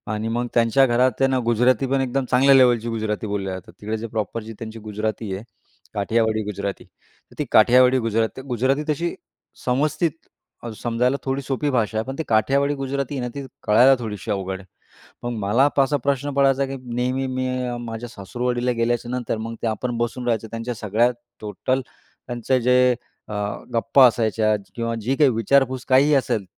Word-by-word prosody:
आणि 110 +1 -2
मग 120 +2 -1
त्यांच्या 120 +3 +4
घरात 125 +1 +3
त्यांना 135 -1 +2
गुजराती 120 +2 +3
पण 135 +1 +1
एकदम 135 +1 -1
चांगल्या 135 +2 +5
लेव्हलची 120 -3 +4
गुजराती 110 -1 -2
बोलल्या 100 -2 -3
जातात, 95 -1 -9
तिकडे 110 +2 -3
जे 115 +1 -5
प्रॉपर 110 0 -3
जी 110 +1 -8
त्यांची 115 0 -7
गुजराती 110 -1 -4
आहे, 95 +3 -5 0.5
काठियावाडी 110 +1 +1
गुजराती. 100 -1 -4
तर - - -28
ती 150 - 0
काठियावाडी 125 +3 +6
गुजराती, 115 +2 -1
गुजराती 130 +2 0
तशी 170 +3 -1 0.5
समस्थित 150 +6 +1 0.5
अ, 120 - -5
समजायला 125 +3 0
थोडी 135 +1 -1
सोपी 140 +2 -2
भाषा 115 -5 0
आहे. 110 - -1
पण 135 - -5
ते 160 - -2
काठियावाडी 140 +6 +2
गुजराती 135 0 -3
आहे - - -2
ना, 125 - -2
ती 140 -1 -5 0.2
कळायला 125 +6 +6
थोडीशी 110 -1 -5
अवघड 95 -1 -3
आहे. 95 - -14 0.6
मग 120 - -2
मला 110 +7 +3
असा 140 +1 +3
प्रश्न 140 +1 -1
पडायचा, 135 0 +3
की 135 0 -5 0.2
नेहमी 130 +2 0
मी 130 0 -2 0.4
माझ्या 115 +1 -6
सासुरवाडीला 120 +3 -2
गेल्याच्यानंतर 120 0 -1
मग 115 +1 -5
ते - - -1
आपण 120 +2 -2
बसून 120 +1 -2
राहायचं, 115 -2 0
त्यांच्या 115 +2 -4
सगळ्या 110 +3 +1 0.3
टोटल, 130 +5 -2 0.5
त्यांचं 120 +1 0
जे 125 +1 +4 0.3
अ, - - -7 0.4
गप्पा 115 +3 +5
असायच्या 110 -2 +1 0.2
किंवा 115 -1 -2
जी 125 +6 0
काही 145 -1 +5
विचारपूस 130 +3 +1
काहीही, 135 +3 +5
असेल 115 -6 0
120 Hz, 170 wpm, -22 LUFS, 110-130 Hz, 0.6 s, काठियावाडी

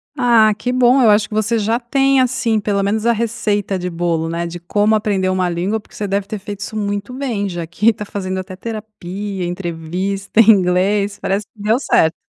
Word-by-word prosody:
Ah, 235 -5 +4
que 250 - -2
bom. 255 +1 +4
Eu 230 - +5
acho 210 +1 +4
que - - -10
você 215 +2 +1
já 225 +3 0
tem, 270 +2 +2
assim, 245 -3 +1
pelo 200 -1 0
menos 215 +3 -1
a 235 - +5
receita 210 -3 -1
de 180 0 -3
bolo, 165 -1 -1
né, 170 +1 -2
de 175 +1 -7
como 205 +5 +1
aprender 200 -3 0
uma 185 -1 0
língua, 185 +6 -1
porque 210 - -19
você 205 - -3
deve 195 0 -1
ter 215 0 -5
feito 205 0 -7
isso 215 - -6
muito 205 +2 -3
bem, 240 -7 -2
já 175 -2 -4
que 205 +6 +2
está 210 -2 -2
fazendo 190 -2 -4
até 185 0 -7
terapia, 205 -3 -6
entrevista, 180 +4 -3
em 225 0 +7
inglês. 200 +1 +1
Parece 195 +1 -1
que 210 - -15
deu 220 +4 +2
certo! 160 - +2
205 Hz, 210 wpm, -18 LUFS, 185-220 Hz, -, em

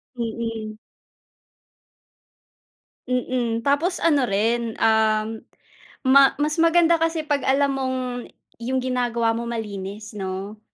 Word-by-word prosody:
Mm. 225 -2 -4 2.3
Mm, 245 -2 -1
tapos 315 +7 +1
ano 290 -6 +3
rin, 225 +3 0
um, 220 -1 +2 0.8
ma 275 0 +7
mas 305 +2 0
maganda 335 0 +4
kasi 325 -1 0
pag 290 -2 +1
alam 280 +1 +3
mong, 260 -1 -1 0.6
yung 260 +3 -1
ginagawa 240 -3 0
mo 235 +1 -4
malinis 210 -2 -5
no? 195 +2 -5
235 Hz, 100 wpm, -23 LUFS, 220-280 Hz, 2.3 s, ma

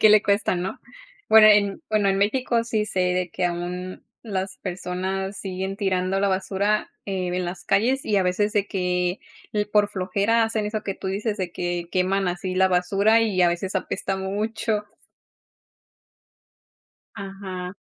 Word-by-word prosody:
¿Qué 215 - +7
le 215 0 +6
cuesta, 200 -2 +1
no? 180 +2 -4 0.5
Bueno, 220 -1 +9
en, 205 +6 +3
bueno, 210 -2 +2
en 195 0 +2
México 230 +2 +1
sí 220 -2 -1
sé 190 - -2
de 180 -1 0
que 185 - -1
aún 180 +1 -4 0.2
las 190 -3 -3
personas 190 +1 -3
siguen 190 0 -4
tirando 190 -1 0
la 200 0 +2
basura, 195 +2 0 0.2
eh, 190 -2 -2
en 180 +1 -1
las 175 +1 -6
calles 245 +7 +2
y 210 - +2
a 195 - +4
veces, 195 +3 +1
de 205 -1 +2
que, 180 -1 -1 0.5
por 205 -1 +4
flojera, 200 +4 +1
hacen 225 -1 -1
eso 210 0 -3
que 195 - -3
tú 190 - -5
dices, 205 +3 -2
de 185 -4 -4
que 175 -1 -3
queman 190 +1 +1
así 180 +1 -3
la 190 0 +4
basura 200 +5 +3
y 200 -5 +2
a 175 - +6
veces, 185 +3 -2
apesta 190 0 -2
mucho. 210 +2 -2 2.3
Ajá. 195 -2 -6
195 Hz, 160 wpm, -24 LUFS, 185-210 Hz, 2.3 s, Bueno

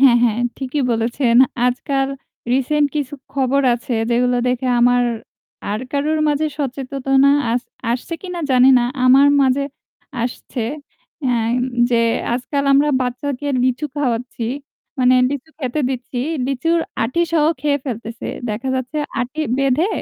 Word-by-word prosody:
হ্যাঁ, 260 -3 +7
হ্যাঁ 235 0 +1 0.2
ঠিকই 270 +1 -2
বলেছেন। 235 +2 +1 0.3
আজকাল 270 +2 0 0.4
রিসেন্ট 290 +3 +2
কিছু 290 0 -2 0.2
খবর 275 0 +1
আছে 240 +1 -4 0.2
যেগুলো 245 +1 +2
দেখে 250 +1 -1
আমার 245 0 +4 0.7
আর 210 - -2
কারুর 300 +2 0
মাঝে 295 +1 +1
সচেতনা 270 0 +1 0.2
আস 245 +1 0 0.3
আসছে 250 +8 -2
কিনা 360 -2 -5
জানি 255 0 +6
না। 240 - +1 0.2
আমার 270 +3 +6 0.2
মাঝে 270 +1 +2 0.6
আসছে 240 0 -4 0.7
আ - - +2 0.6
যে, 235 - +3 0.3
আজকাল 280 +3 -2
আমরা 285 +2 +4
বাচ্চাকে 255 +3 -3 0.2
লিচু 255 +4 0
খাওয়াচ্ছি। 245 -3 -2 0.5
মানে 255 0 +4 0.2
লিচু 285 +2 -5
খেতে 265 0 -2
দিচ্ছি 250 -1 -5 0.3
লিচুর 330 +6 +1 0.2
আটি 255 +9 0
সহ 310 -3 +3 0.2
খেয়ে 285 -1 +1
ফেলতেছে। 230 -2 -5 0.2
দেখা 230 +5 -4
যাচ্ছে 260 +4 -3 0.2
আঁটি 260 +6 -4 0.2
বেঁধে 275 +7 +2
260 Hz, 130 wpm, -19 LUFS, 245-285 Hz, 0.7 s, হ্যাঁ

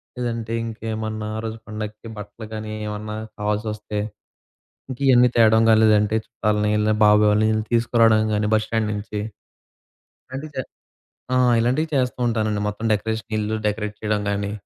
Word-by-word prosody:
లేదంటే 115 -2 -3
ఇంకేమన్నా 110 -1 -4
ఆ - - -2
రోజు 110 0 -4
పండగకి 110 +1 -6
బట్టలు 105 +2 -8
గానీ, 110 0 -5 0.2
ఏమన్నా 105 0 -5 0.2
కావాల్సొస్తే, 105 0 -2 0.9
ఇంకా 130 +2 -6
ఇయన్నీ 125 -1 +6
తేవడం 110 -1 +5
గాని, 110 - +6
లేదంటే 105 0 +4
చుట్టాల్ని 105 -2 0 0.3
బాబాయి 105 0 +6
వాళ్ళని 105 +1 +3
ఈళ్ళని 110 0 -1
తీసుకురావడం 115 -2 +4
కానీ 105 0 0
బస్ 110 0 +2
స్టాండ్ 110 -1 0
నుంచి. 105 0 -4 1.2
అంటే 145 +3 -5
జ - - -8 0.8
ఆ! - - +4 0.2
ఇలాంటి 125 +6 +2
చేస్తా 130 -2 0
ఉంటానండి. 110 -2 0
మొత్తం 105 +2 -6
డెకరేషన్ 110 +1 -3
ఇల్లు 105 +1 -1
డెకరేట్ 105 0 -2
చేయడం 105 -1 0
గానీ, 100 0 -2
110 Hz, 145 wpm, -22 LUFS, 105-115 Hz, 1.2 s, ఇయన్నీ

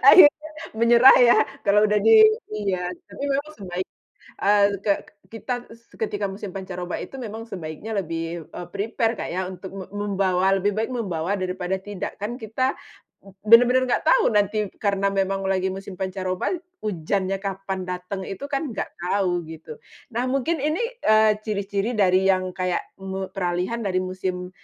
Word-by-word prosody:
Akhirnya, 310 -2 +8 0.3
menyerah 235 +3 +7
ya, 240 -1 +7 0.3
kalau 210 +1 +4
udah 210 0 +2
di 440 -1 +8 0.3
ini 205 -3 -1
ya, 180 0 -3 0.2
tapi 280 - -6
memang 285 +2 -1
sebaik 185 -2 -5 0.6
eee, 200 0 +5 0.2
ke 200 - +3 0.3
kita 225 +3 -4 0.4
ketika 205 -2 -1
musim 195 +1 -7
pancaroba 180 -2 -5
itu - - -10
memang 225 -2 -6
sebaiknya 180 +1 -7
lebih, 165 -1 -4
eee, 175 - -7
prepare 225 +3 0 0.4
untuk 190 0 -9
mem 195 -1 -7
membawa 195 -2 +1
lebih 205 +2 +1
baik 220 +3 -1
membawa 190 -5 -2
daripada 185 0 -2
tidak 200 -1 -6
kan. 210 +4 -4
Kita 230 +5 -1 0.7
benar-benar 245 +4 +6
nggak 310 - 0
tahu - - +5
nanti 210 -1 +1
karena 200 -1 +1
memang 195 0 0
lagi 190 -1 +1
musim 195 0 -8
pancaroba, 185 - -2 0.3
hujannya 195 +1 -1
kapan 195 -1 -4
dateng 180 +2 -4
itu 195 +6 -6
kan 285 0 -2
nggak 220 - -4
tahu 180 -1 0
gitu. 165 - -9 0.4
Nah 240 +2 0
mungkin 275 +5 0
ini, 310 +8 0 0.2
eee, 215 -1 +5
ciri-ciri 205 +1 -2
dari 185 -1 +4
yang 185 -1 +2
kayak 180 -1 -1 0.2
me 190 0 -4
peralihan 180 +4 -1
dari 185 -3 0
musim 185 -1 -4
195 Hz, 150 wpm, -24 LUFS, 185-225 Hz, 0.7 s, Akhirnya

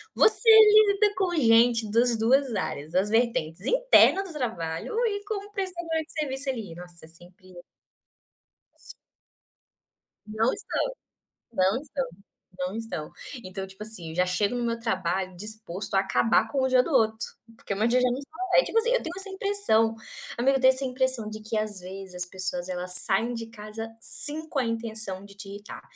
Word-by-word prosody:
Você 450 +1 +6
lida 425 -1 +6
com 365 -2 0
gente 230 -4 +3
das 235 +1 +2
2 255 +3 +2
áreas, 145 -4 -4
das 185 +4 +1
vertentes 225 -9 0
interna - - +4
do 380 - -10
trabalho 175 - -4
e 405 -2 -2
como 410 -1 -5
prestadora 345 -5 -3
de 305 - -19
serviço 275 -3 -1
ali. 220 -9 -5
Nossa, 175 -1 -10
é - - -16
sempre 180 +3 -15 1.2
Isso - - -15 1.3
Não 220 +3 0
estão, 415 - -3 0.7
não 195 +4 +1
estão, 280 -2 -4 0.5
não 180 +3 -3
estão. 185 -9 -6 0.3
Então, 190 +1 -6
tipo 190 +2 -12
assim, 200 -7 -4
eu - - -8
já 180 +2 +2
chego 200 +5 0
no 245 -1 -2
meu 230 0 -2
trabalho 185 -4 -2
disposto 205 -1 -2
a 195 - +4
acabar 195 +4 +1
com 275 -2 -1
o 260 - +2
dia 255 -1 +4
do 330 - -6
outro, 220 -3 +2 0.3
porque 200 - -5
meu 215 +3 0
dia 250 +2 +3
já 250 - +3
não 245 - -2
está 280 +2 -11 0.2
leve, - - +6
é - - -5
tipo 455 - 0
assim, 470 +1 +1
eu - - +1
tenho 330 - -6
essa 390 +1 +2
impressão. 385 - +1 0.4
Amiga, 270 +3 +2
eu - - -7
tenho 260 0 +6
essa 260 +1 0
impressão 255 -3 -1
de 215 0 -8
que 215 0 -3
às 210 -3 -3
vezes 190 0 -9
as 180 0 -1
pessoas 185 -1 -2
elas 180 0 -2
saem 225 +7 +4
de 230 -1 -6
casa 225 0 -8
sim, 310 +6 +1
com 295 - -4
a - - 0
intenção 220 -4 -3
de 200 0 -14
te 200 0 -11
irritar. 205 +2 -10
225 Hz, 185 wpm, -26 LUFS, 195-275 Hz, 1.3 s, Você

